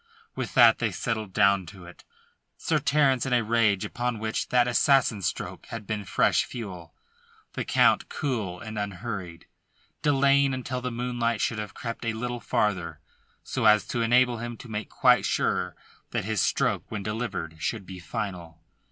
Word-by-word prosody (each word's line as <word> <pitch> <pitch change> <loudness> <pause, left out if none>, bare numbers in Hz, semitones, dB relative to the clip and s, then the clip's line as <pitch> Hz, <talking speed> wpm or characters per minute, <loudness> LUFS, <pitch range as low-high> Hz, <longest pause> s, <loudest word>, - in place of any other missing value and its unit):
With - - -5
that - - +7
they - - +1
settled 110 -5 -3
down 100 -2 +3
to 90 -1 -11
it, 85 - -14 0.5
Sir - - 0
Terence 135 -3 +2
in 130 - 0
a 120 -1 +3
rage 110 -3 +2
upon 120 -1 -2
which 110 0 -2
that 125 -1 +3
assassin 120 -3 +3
stroke 85 - -4
had 115 -2 -7
been 105 -1 -3
fresh - - +2
fuel; 95 -8 -8 0.6
the - - -3
Count - - +3
cool 110 - -3
and 110 -2 -6
unhurried, 100 -4 -5 0.6
delaying 140 -2 +3
until 130 0 -4
the 125 - -2
moonlight 120 -2 -1
should 115 0 -1
have 105 -2 -6
crept 115 -1 -6
a 115 -1 -1
little 120 +2 -4
farther, 105 -5 -1 0.4
so - - -2
as 105 0 +6
to 120 - -1
enable 120 +1 +3
him 120 0 -5
to 125 - -11
make 110 -1 -5
quite - - +4
sure - - 0 0.3
that - - -2
his 110 -4 0
stroke - - 0
when 105 -2 -4
delivered 100 -7 -4
should 105 +1 -2
be 95 -1 -9
final. 85 -1 -5
110 Hz, 170 wpm, -26 LUFS, 100-120 Hz, 0.6 s, that